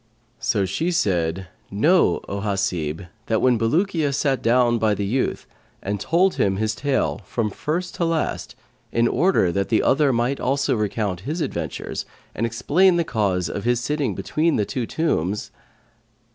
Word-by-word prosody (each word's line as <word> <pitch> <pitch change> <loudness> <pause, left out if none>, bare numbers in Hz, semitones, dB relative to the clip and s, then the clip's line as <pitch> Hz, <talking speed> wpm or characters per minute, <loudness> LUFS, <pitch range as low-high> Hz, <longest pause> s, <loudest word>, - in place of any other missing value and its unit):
So 100 -3 +1
she 160 - -1
said: 95 - 0 0.2
"Know, 155 - +3
O 100 - -3
Hasib, 95 -5 -2 0.2
that 110 - +1
when 125 -3 +3
Bulukiya 155 - +1
sat 135 -2 0
down 120 0 +3
by 110 -2 +2
the 100 - -2
youth 125 +6 -1 0.3
and 100 +1 -3
told 180 - +2
him 95 -1 +2
his 110 +2 -1
tale, 130 +4 -1
from 105 +2 -2
first 175 - -3
to 170 - +1
last, 165 -1 -2 0.4
in 115 0 +2
order 170 - +2
that 100 +2 -1
the 110 - +2
other 140 +1 +3
might 120 +3 0
also 135 +2 +1
recount 105 -3 -1
his 150 - -4
adventures - - -4 0.3
and 115 - -1
explain 155 +11 +3
the 170 - +2
cause 95 - 0
of 100 - -4
his 120 0 +2
sitting 135 -4 -1
between 155 - 0
the 105 - +1
two 120 0 -3
tombs." 105 - -1
115 Hz, 160 wpm, -22 LUFS, 100-150 Hz, 0.4 s, Know